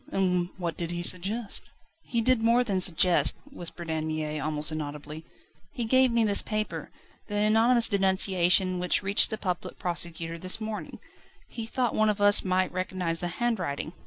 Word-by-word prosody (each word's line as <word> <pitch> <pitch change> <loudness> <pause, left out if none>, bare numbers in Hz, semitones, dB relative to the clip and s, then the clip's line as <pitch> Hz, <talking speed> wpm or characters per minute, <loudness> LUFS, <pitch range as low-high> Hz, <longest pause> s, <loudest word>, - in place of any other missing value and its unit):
And 180 -2 0
what 170 -4 -4
did 170 -1 -4
he 175 0 -4
suggest?" 200 +5 -2 0.4
"He 235 -2 -2
did 255 0 +2
more 235 +2 +3
than 195 -6 -1
suggest," 180 0 +3 0.2
whispered 175 -7 -8
Anne 160 0 -2
Mie 155 -1 -3
almost 150 +1 +2
inaudibly; 150 +1 -7 0.5
"he 245 -5 -3
gave 260 +2 +3
me 235 -1 +2
this 205 -2 +3
paper 215 -1 -4 0.4
the 205 - -5
anonymous 225 +3 +5
denunciation 190 -2 +2
which 180 +3 0
reached 200 +2 +4
the 220 - -4
Public 180 -4 -4
Prosecutor 170 -1 -3
this 185 +5 -1
morning 215 -1 -6 0.5
he 230 -2 -7
thought 245 0 -1
one 215 0 +2
of 210 -1 -1
us 205 0 +5
might 185 -1 0
recognise 185 -2 -2
the 175 - -3
handwriting." 180 -7 -3
185 Hz, 165 wpm, -27 LUFS, 170-220 Hz, 0.5 s, anonymous